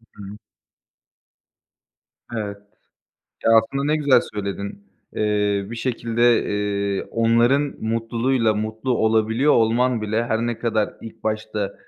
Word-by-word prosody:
Hı 105 - -10
hı. 100 +2 -9 2.0
Evet. 105 -3 -4 0.9
Ya, - - +4
aslında 115 +5 +3
ne 150 +2 +2
güzel 145 -3 +4
söyledin. 100 0 -5 0.3
Eee, 105 -1 +1
bir 120 - -5
şekilde, 120 -1 +1
eee, 100 -1 -1
onların 120 +5 +2
mutluluğuyla 115 +1 0
mutlu 110 +4 -2
olabiliyor 110 +5 +2
olman 115 +1 +2
bile, 110 +2 0
her 110 -1 0
ne 120 -1 -3
kadar 110 -3 -1
ilk 115 - -11
başta 110 -2 -2
110 Hz, 115 wpm, -22 LUFS, 105-120 Hz, 2.0 s, Ya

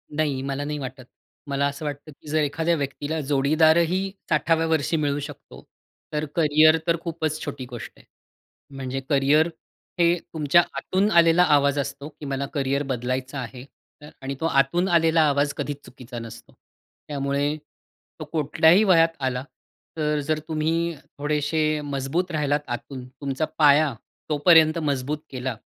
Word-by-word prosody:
नाही 145 -4 0
मला 135 +1 -3
नाही 150 +1 -3
वाटत. 130 -1 -7 0.4
मला 140 0 0
असं 140 +2 -6
वाटतं, 145 +1 -6
की 140 - -19
जर 155 +1 +1
एखाद्या 160 +4 0
व्यक्तीला 145 +2 -3
जोडीदारही 160 +6 +2 0.2
60व्या 165 0 +2
वर्षी 160 0 +1
मिळू 145 -1 0
शकतो. 145 - -10 0.5
तर 150 0 -1
करिअर 155 0 +5
तर 170 0 +3
खूपच 160 -2 -3
छोटी 140 -3 -5
गोष्ट 120 -3 -8
आहे. - - -20 0.7
म्हणजे 135 0 -4
करिअर 145 +3 +4 0.5
हे 170 +1 +4 0.2
तुमच्या 155 +2 +4 0.2
आतून 195 +3 +1
आलेला 170 +1 +5
आवाज 145 -3 +3
असतो, 140 +1 -5
की 150 0 -12
मला 140 0 -2
करिअर 140 -1 0
बदलायचं 130 +2 -3
आहे. 125 0 -7 0.4
तर 150 - -11
आणि 135 +1 -4
तो 160 - -2
आतून 165 +5 +2
आलेला 165 -2 +3
आवाज 145 0 +1
कधीच 145 0 -4
चुकीचा 125 -1 -9
नसतो. 115 0 -11 0.5
त्यामुळे, 140 0 -1 0.6
तो 155 - -5
कुठल्याही 160 +5 +4
वयात 165 -4 +4
आला 130 -1 -2 0.5
तर 150 -1 0
जर 155 -1 +1
तुम्ही 165 +1 -1 0.2
थोडेशे 150 +2 -1 0.2
मजबूत 145 +6 -2
राहिलात 150 -2 +1
आतून, 125 +1 -6
तुमचा 135 +3 -3
पाया 150 -1 +5 0.4
तोपर्यंत 155 +1 +5
मजबूत 145 -2 -1
केला 130 -2 -4
145 Hz, 145 wpm, -24 LUFS, 140-160 Hz, 0.7 s, करिअर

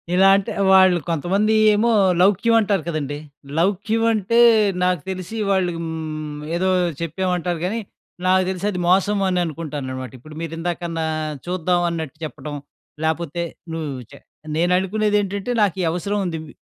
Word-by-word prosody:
ఇలా 190 +1 +6
అంటే 200 -1 -1 0.2
వాళ్ళు 185 -2 +6
కొంతమంది 190 +7 +1 0.2
ఏమో 215 +3 +2 0.3
లౌక్యం 205 +5 +4
అంటారు 200 -5 +1
కదండీ! 145 -3 -3 0.4
లౌక్యం 205 +6 +1
అంటే 220 +1 0 0.5
నాకు 180 -3 +1
తెలిసి 185 +3 -5
వాళ్ళు 190 -2 +2
హ్మ్, 155 -2 -5 0.2
ఏదో 185 +2 +1 0.3
చెప్పామంటారు 175 +1 -1
గానీ, 215 +5 -1 0.5
నాకు 185 0 +4
తెలిసది 190 0 -2
మోసం 195 +3 +3
అని 180 -1 +1
అనుకుంటాననమాట. 145 -5 -5
ఇప్పుడు 155 +5 -13
మీరు 165 -1 -5
ఇందాకన్నా 165 -1 -3 0.4
చూద్దామన్నట్టు 175 -3 -1
చెప్పడం 150 -1 -7 0.5
లేపోతే 165 +1 -1 0.3
నువ్వు 160 -3 -3 0.2
చె 140 - -12 0.4
నేను 175 +3 +1
అనుకునేదేంటంటే 205 +2 0
నాకు 200 -3 +2
ఈ - - 0
అవసరముంది. 180 0 -2
ఇవ్ 160 - -11
180 Hz, 130 wpm, -21 LUFS, 160-195 Hz, 0.5 s, ఇలా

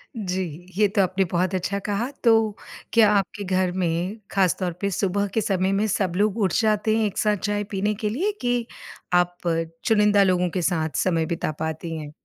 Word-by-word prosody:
जी, 190 -4 -2 0.3
ये 210 0 +5
तो 200 +1 +1
आपने 190 +1 +1
बहुत 185 +1 0
अच्छा 190 +2 -1
कहा 210 +4 -1
तो 225 -3 +4 0.4
क्या 225 -3 +6
आपके 200 0 -1
घर 185 -1 +1
में, 180 +2 -1
ख़ासतौर 185 -2 +1
पे 200 - +1
सुबह 200 +2 0
के 220 - +1
समय 190 -2 0
में 200 +2 +1
सब 195 -3 0
लोग 205 +2 +1
उठ 185 -4 +1
जाते 215 0 +2
हैं 220 - +2
एक 205 -2 -3
साथ 210 -1 +2
चाय 205 +1 -1
पीने 205 +1 0
के 210 +1 -2
लिए 340 - 0
कि 245 -1 0 0.5
आप 175 0 +2 0.5
चुनिंदा 210 -2 +4
लोगों 180 -1 +2
के 180 +2 -2
साथ 160 -3 0
समय 165 -3 +1
बिता 165 -2 -2
पाती 160 +1 -4
हैं? 150 -2 -7
195 Hz, 190 wpm, -24 LUFS, 180-210 Hz, 0.5 s, क्या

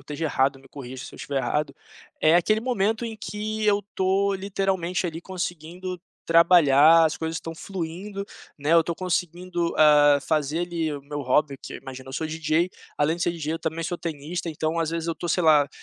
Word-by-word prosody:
esteja 150 +2 -5
errado, 135 -1 +1
me 135 - -19
corrija 130 -2 -8
se - - -10
eu - - -11
estiver 140 -1 -3
errado, 140 +3 -1 0.5
é 155 +2 +5
aquele 215 +5 +2
momento 225 -2 0
em 225 -1 -5
que 215 +1 -4
eu 205 -1 +3
tô 195 +1 +1
literalmente, 190 -2 -1
ali, 165 -1 -5
conseguindo 180 0 -5 0.3
trabalhar, 165 -2 +6
as 155 - 0
coisas 160 0 -3
estão 165 0 -6
fluindo, 195 +3 -5 0.3
né? 145 +3 0
Eu 165 0 +7
tô 170 +1 -3
conseguindo, 175 -1 -2
hã, 145 -1 +6
fazer, 155 +1 0
ali, 170 -2 -2
o 145 -2 -6
meu 145 +1 -5
hobby, 140 +2 +1
que, - - -8
imagina, 130 -1 -10
eu - - -8
sou 160 - -2
DJ. 160 +2 0 0.3
Além 150 +3 +1
de 175 - -3
ser 175 - +2
DJ, 160 -2 -4
eu 165 - -4
também 160 +1 -3
sou 175 +1 -3
tenista, 165 +2 -4
então 160 +1 -2
às 165 -1 0
vezes 165 0 -3
eu 165 - -1
tô, 175 - -5
sei 180 +2 +1
lá, 150 -3 +5
165 Hz, 200 wpm, -25 LUFS, 150-180 Hz, 0.5 s, Eu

